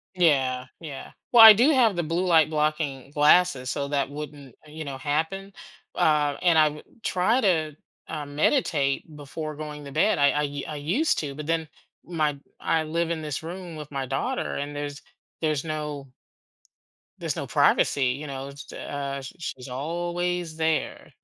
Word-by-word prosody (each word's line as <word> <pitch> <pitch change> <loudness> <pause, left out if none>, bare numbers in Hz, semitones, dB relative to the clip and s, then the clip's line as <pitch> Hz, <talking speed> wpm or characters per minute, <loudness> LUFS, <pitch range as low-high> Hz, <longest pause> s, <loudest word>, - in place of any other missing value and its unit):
Yeah, 135 -7 +2
yeah. 145 -5 -8 0.2
Well, 235 -2 +10
I 220 - +14
do 245 +9 +4
have 235 -7 +4
the 175 - +1
blue-light-blocking 155 -5 +1
glasses, 150 -3 +4
so 140 +2 -2
that 140 -2 0
wouldn't, 145 -3 -8
you 155 0 -8
know, 135 -1 -5
happen. 160 +8 -2 0.4
Uh, 150 -2 +2
and 175 -3 +4
I 155 -1 +6
wou 150 +1 -9 0.2
try 220 +8 +2
to, 160 - +1 0.3
um, 145 -2 -6
meditate 150 - +1
before 150 +1 -6
going 150 0 -7
to 140 - -8
bed. 165 +9 +2
I 140 0 +5
I 150 - 0
u 145 -1 -4
I 155 - -5
used 185 - +1
to, 140 -3 -4
but, 150 0 -7
then, 165 -1 0 0.4
my 155 -4 -1 0.2
I 160 -1 +1
live 165 +2 -1
in 165 -2 -2
this 150 -2 -3
room 175 0 -7
with 150 -1 -8
my 135 -1 -3
daughter 190 - -2
and 145 +1 -4
there's 145 0 -5 0.4
there's 155 -3 0
no 150 -3 -4 1.1
there's - - -3
no - - -4
privacy, 135 -2 +3
you 140 +5 -3
know, 135 0 -6
s 140 0 -11
uh, 140 -1 -4
sh 135 - -9
she's 130 -6 -6
always 175 +4 -3
there. 160 -1 -1
150 Hz, 165 wpm, -25 LUFS, 140-170 Hz, 1.1 s, I